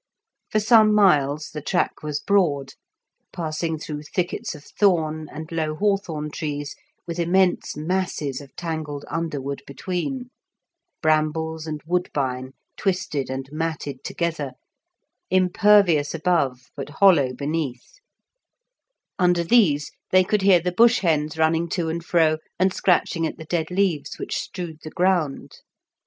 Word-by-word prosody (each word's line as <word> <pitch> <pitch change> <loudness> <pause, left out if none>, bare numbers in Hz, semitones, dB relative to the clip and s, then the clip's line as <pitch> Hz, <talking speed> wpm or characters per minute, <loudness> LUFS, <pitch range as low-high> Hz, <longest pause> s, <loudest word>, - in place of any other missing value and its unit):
For 215 - +2
some 215 0 +5
miles 150 -7 +3
the 150 - -5
track - - -1
was 150 -1 -3
broad, 155 -9 +1 0.6
passing 160 0 -3
through 150 -1 -6
thickets 175 +2 -3
of 145 - -12
thorn 155 -6 +1
and 155 +2 -8
low 155 -2 -1
hawthorn 170 -6 -1
trees 145 -2 -4 0.3
with 170 0 -5
immense 180 -1 +2
masses 155 -4 -2
of 140 - -15
tangled 155 -4 -4
underwood 140 -4 -3
between, 195 - -4 0.7
brambles 155 +1 0
and 155 -1 -4
woodbine 135 -7 -2 0.2
twisted 180 -8 -1
and 130 0 -4
matted 155 -4 -4
together, 160 -6 -3 0.8
impervious 185 -4 +4
above 140 -7 0
but 140 0 -6
hollow 155 -6 +4
beneath; 150 - -4 1.2
under 175 -1 +3
these 165 -8 +3 0.2
they 185 0 +5
could 210 +2 0
hear 190 -2 +6
the 180 +2 -2
bush 230 +6 +5
hens 155 -3 0
running 160 +1 +2
to 170 -2 -1
and 165 +1 -3
fro 160 -2 +2 0.2
and 185 +1 +2
scratching 165 -2 +1
at - - -7
the 160 - -9
dead 160 0 -1
leaves 180 -5 0
which - - -3
strewed 170 -4 -6
the 155 - -7
ground. 175 -4 0
160 Hz, 130 wpm, -23 LUFS, 150-180 Hz, 1.2 s, hear